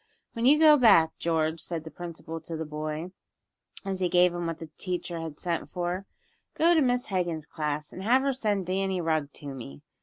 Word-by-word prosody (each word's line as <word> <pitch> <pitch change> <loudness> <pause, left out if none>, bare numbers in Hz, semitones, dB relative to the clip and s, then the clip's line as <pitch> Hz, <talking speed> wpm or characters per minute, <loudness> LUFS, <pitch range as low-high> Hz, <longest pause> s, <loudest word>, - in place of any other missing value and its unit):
"When 235 +1 +1
you 295 +3 +7
go 305 -1 +7
back, 165 - +5
George," 160 -1 0
said 165 -3 -4
the 160 - -9
principal 165 -2 -7
to 165 - -6
the 160 - -4
boy, 155 +3 -4 0.7
as 190 -1 -2
he 180 -1 +1
gave 180 0 +4
him 175 -1 -3
what 165 -1 -3
the 165 -2 -10
teacher 175 -2 -3
had 160 -2 -7
sent 170 -2 -2
for, 180 +2 -3 0.5
"go 335 +2 +4
to 320 - +4
Miss 245 -3 +1
Hegan's 175 -5 -1
class, 150 -1 -4
and 185 - -7
have 250 +6 +3
her 275 0 +1
send 210 -7 -1
Danny 190 +1 -1
Rugg 155 -4 0
to 140 -2 -7
me. 70 - -9
175 Hz, 205 wpm, -28 LUFS, 160-195 Hz, 0.7 s, you